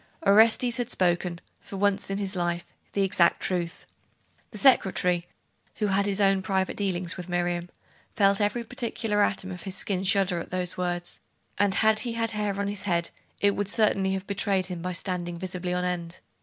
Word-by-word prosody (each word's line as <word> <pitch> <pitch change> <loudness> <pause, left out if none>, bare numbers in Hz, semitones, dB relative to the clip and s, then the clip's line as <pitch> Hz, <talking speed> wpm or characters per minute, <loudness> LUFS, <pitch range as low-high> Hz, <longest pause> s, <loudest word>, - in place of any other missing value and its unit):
Orestes 225 +3 +5
had 245 -2 -2
spoken, 175 -1 0 0.2
for - - -10
that - - -5
once 200 -1 +1
in 195 - -2
his 200 -1 -2
life, 175 -1 -1 0.3
the 200 - +1
exact 175 -3 +3
truth. 175 -2 -3 0.6
The 215 - -9
secretary, 180 -8 +3 0.5
who 215 - -1
had 200 0 +1
his 200 0 0
own 195 -1 +4
private 190 -1 -1
dealings 185 -3 -2
with 180 0 -7
Miriam, 175 0 -1 0.5
felt 200 0 +3
every 210 +4 0
particular 225 -3 -1
atom 190 -2 0
of 180 - -7
his 190 -2 -4
skin 190 -1 0
shudder 190 -2 +2
at - - -7
those 180 -1 -2
words; 175 -1 -3 0.4
and 200 -1 +3
had 220 0 +4
he 235 0 -3
had 230 0 -1
hair 210 -2 -2
on 200 - -1
his 205 -1 -4
head, 170 -1 0 0.3
it 200 0 +3
would 205 -1 0
certainly 200 -3 +2
have 190 0 -3
betrayed 200 -1 +1
him 180 -2 -4
by 180 +1 -3
standing 175 -1 -3
visibly 180 0 -4
on 180 0 0
end. 175 -1 -4
190 Hz, 190 wpm, -26 LUFS, 180-205 Hz, 0.6 s, Orestes